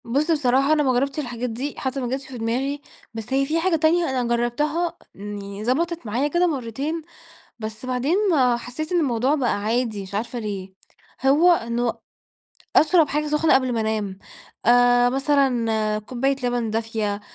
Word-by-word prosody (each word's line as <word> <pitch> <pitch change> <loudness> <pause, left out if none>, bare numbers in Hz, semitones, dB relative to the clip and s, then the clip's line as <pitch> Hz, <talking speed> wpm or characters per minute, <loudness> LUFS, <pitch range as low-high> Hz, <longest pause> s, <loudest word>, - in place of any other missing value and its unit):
بُصّ 285 +8 +1
بصراحة 275 -1 +3
أنا 300 -1 +2
ما 260 -2 +2
جرّبتش 275 +4 0
الحاجات 245 -3 -3
دي، 260 +6 -4
حتى 265 +1 -3
ما 250 - -2
جاتش 265 +1 -4
في 260 - -8
دماغي، 260 +5 -2 0.3
بس 225 +3 -6
هي 275 +1 +2
في 315 +4 0
حاجة 350 0 +2
تانية 325 +1 +2
أنا 260 -2 0
جرّبتها، 300 +9 -1 0.2
يعني 200 0 -7
ضبَطِت 330 +6 -1
معايا 240 +7 0
كده 345 +4 +2
مرّتين، 280 +3 -3 0.6
بس 220 +2 -7
بعدين 255 +7 0 0.4
حسّيت 250 +8 -6
إن 350 - +3
الموضوع 260 -1 +1
بقى 250 -8 0
عادي، 225 -2 -1
مش 190 +1 -10
عارفة 235 +4 -3
ليه، 200 -4 -5 0.5
هو 315 +6 +6
إنه 235 -5 -1 0.8
أشرَب 320 -1 +5
حاجة 300 +1 -1
سخنة 300 +1 +3
قبْل 260 -1 +2
ما 230 - 0
أنام، 215 -3 -2 0.5
آآ، 245 0 +5
مثلًا 245 -6 +1
كوباية 255 +5 -1
لبن 245 -2 0
دافية، 220 -2 -2
250 Hz, 165 wpm, -23 LUFS, 225-295 Hz, 0.8 s, هو